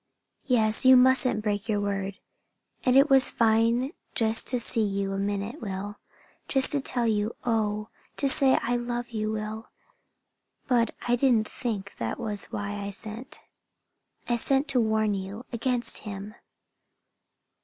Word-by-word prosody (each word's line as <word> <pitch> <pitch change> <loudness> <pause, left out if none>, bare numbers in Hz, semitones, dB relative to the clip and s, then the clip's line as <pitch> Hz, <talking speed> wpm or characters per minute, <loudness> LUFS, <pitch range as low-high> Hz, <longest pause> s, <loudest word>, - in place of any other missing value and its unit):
"Yes, 220 -3 +3
you 260 0 +8
mustn't 255 -3 +3
break 205 +1 -2
your 210 -1 +1
word. 200 -1 -3 0.7
And 250 - +4
it 275 +2 +6
was 270 -2 +6
fine 230 +5 +1 0.2
just 225 -1 +1
to 250 - +1
see 230 -1 +1
you 195 -1 -1
a 195 - -3
minute, 205 +7 -3
Will; 205 0 -6 0.5
just 270 -2 +4
to 285 - +2
tell 245 -2 0
you 215 0 0
oh, 215 -2 -1 0.3
to 280 - +1
say 270 0 +6
I 245 +1 0
love 240 0 -4
you, 215 -1 -2
Will! 215 +1 -5 1.0
But 235 -2 +1
I 245 - +3
didn't 240 -4 +2
think 210 -6 -5
that 115 -1 -4
was 205 -2 -4
why 205 0 -5
I 200 - -4
sent. 220 +8 -8 0.9
I 240 - +1
sent 270 +4 +1
to 255 -3 +3
warn 220 -1 +1
you 195 +4 -6
against 240 0 -2
him. 205 0 -8
220 Hz, 150 wpm, -26 LUFS, 205-245 Hz, 1.0 s, you